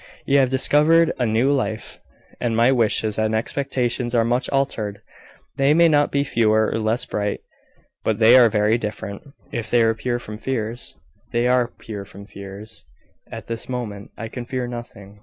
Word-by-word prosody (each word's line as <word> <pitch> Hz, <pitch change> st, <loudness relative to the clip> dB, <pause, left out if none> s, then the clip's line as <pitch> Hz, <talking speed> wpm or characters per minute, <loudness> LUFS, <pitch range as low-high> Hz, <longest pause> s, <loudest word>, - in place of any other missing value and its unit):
You 140 Hz, +1 st, +4 dB
have 130 Hz, -2 st, +3 dB
discovered 150 Hz, +5 st, +4 dB
a 125 Hz, -, +1 dB
new 115 Hz, +5 st, +2 dB
life, 130 Hz, -6 st, -2 dB, 0.4 s
and 115 Hz, -2 st, -1 dB
my 120 Hz, +3 st, +5 dB
wishes 110 Hz, -3 st, +1 dB
and 110 Hz, 0 st, +1 dB
expectations 125 Hz, 0 st, -2 dB
are 115 Hz, -1 st, +3 dB
much 120 Hz, +3 st, 0 dB
altered. 115 Hz, -7 st, -1 dB, 0.6 s
They 140 Hz, +2 st, +4 dB
may 170 Hz, 0 st, +6 dB
not 145 Hz, -1 st, +3 dB
be 140 Hz, 0 st, +1 dB
fewer, 110 Hz, -4 st, +2 dB
or -, -, -1 dB
less 110 Hz, +2 st, 0 dB
bright, 105 Hz, -1 st, -2 dB, 0.6 s
but -, -, 0 dB
they 115 Hz, +2 st, +7 dB
are 120 Hz, -3 st, +7 dB
very 105 Hz, +2 st, +2 dB
different." 105 Hz, -2 st, -5 dB, 0.3 s
"If 115 Hz, -2 st, -4 dB
they 120 Hz, -1 st, +4 dB
were 115 Hz, -, +3 dB
pure 120 Hz, +2 st, -2 dB
from 110 Hz, -3 st, -9 dB
fears 115 Hz, -2 st, -4 dB, 0.2 s
" -, -, -38 dB
"They 120 Hz, +1 st, +2 dB
are 125 Hz, -1 st, +3 dB
pure 105 Hz, -4 st, -8 dB
from 100 Hz, +1 st, -12 dB
fears. 100 Hz, -2 st, -10 dB, 0.5 s
At -, -, -7 dB
this 115 Hz, +1 st, -6 dB
moment 110 Hz, -5 st, -5 dB
I 115 Hz, -, -5 dB
can 125 Hz, +2 st, -6 dB
fear 125 Hz, +1 st, -3 dB
nothing. 110 Hz, -4 st, -9 dB
115 Hz, 180 wpm, -22 LUFS, 110-130 Hz, 0.6 s, they